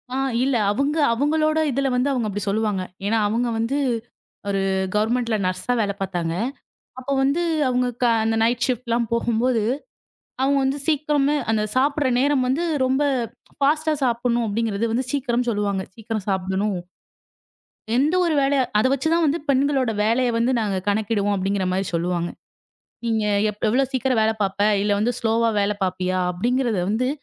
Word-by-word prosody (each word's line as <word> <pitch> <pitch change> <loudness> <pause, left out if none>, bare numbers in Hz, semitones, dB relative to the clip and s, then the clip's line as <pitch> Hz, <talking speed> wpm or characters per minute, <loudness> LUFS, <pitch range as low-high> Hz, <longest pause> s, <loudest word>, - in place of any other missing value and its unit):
ஆ - - -1 0.3
இல்ல. 270 -1 +1 0.2
அவங்க 280 +8 0 0.2
அவங்களோட 310 +5 +1
இதுல 275 +2 0
வந்து 250 +3 +1
அவங்க 245 -5 -1
அப்டி 205 +1 -4
சொல்லுவாங்க. 210 -2 0 0.2
ஏன்னா 220 +3 +1
அவங்க 230 +4 0
வந்து 230 +5 0 0.7
ஒரு 195 -1 0 0.4
கவெர்மெண்ட்ல 230 +2 +1
நர்ஸா 185 +5 -2
ஆ - - -1
வேல 200 -1 -1
பாத்தாங்க. 175 -4 -2 0.7
அப்ப 255 +2 -6
வந்து 280 +5 +2 0.3
அவங்க 250 0 +1 0.2
க - - +5 0.2
அந்த 225 0 +1
நைட் 235 +1 +1
ஃசிப்ட்லாம் 240 -2 -1
போகும்போது, 235 0 +1 0.8
அவங்க 275 +1 +3
வந்து 265 +2 0
சீக்கிரமே 295 -2 +2
அந்தச் 215 -1 0
சாப்புடுற 280 +1 +2
நேரம் 275 -1 +2
வந்து 270 +7 0 0.2
ரொம்ப 265 +3 +1 0.5
ஃபாஸ்ட்டா 310 +3 +2
சாப்புடணும் 240 -1 +1
அப்டிங்கறது 220 0 -1
வந்து 250 +3 0
சீக்கிரம் 250 -3 0
சொல்லுவாங்க. 205 -3 -1
சீக்கிரம் 225 -2 -4
சாப்புடணும். 190 +1 -1 1.2
"எந்த 290 +7 +2
ஒரு 335 -2 +1
வேலைய 275 0 +2 0.2
அதை 255 - +3
வச்சுதான் 320 +5 +1
வந்து 300 +3 +1
பெண்களோட 270 -2 +2
வேலைய 240 +3 +2
வந்து 240 +3 +2
நாங்க 205 -3 -1
கணக்கிடுவோம்" 205 0 0
அப்டிங்கிற 195 0 -1
மாரி 190 +1 -1
சொல்லுவாங்க. 175 0 -1 0.8
"நீங்க 225 -2 0 0.3
எப் 210 - -14
எவ்வளவு 265 +3 +1
சீக்கிரம் 260 -2 +1
வேல 220 0 +2
பாப்ப? 195 0 -3 0.2
இல்ல 205 - +1
வந்து 235 +4 +1
ஸ்லோவா 230 0 +2
வேல 205 +1 +1
பாப்பியா?" 185 0 -1
அப்டிங்கறத 240 +2 0
வந்து, 240 +5 0
235 Hz, 150 wpm, -22 LUFS, 205-270 Hz, 1.2 s, க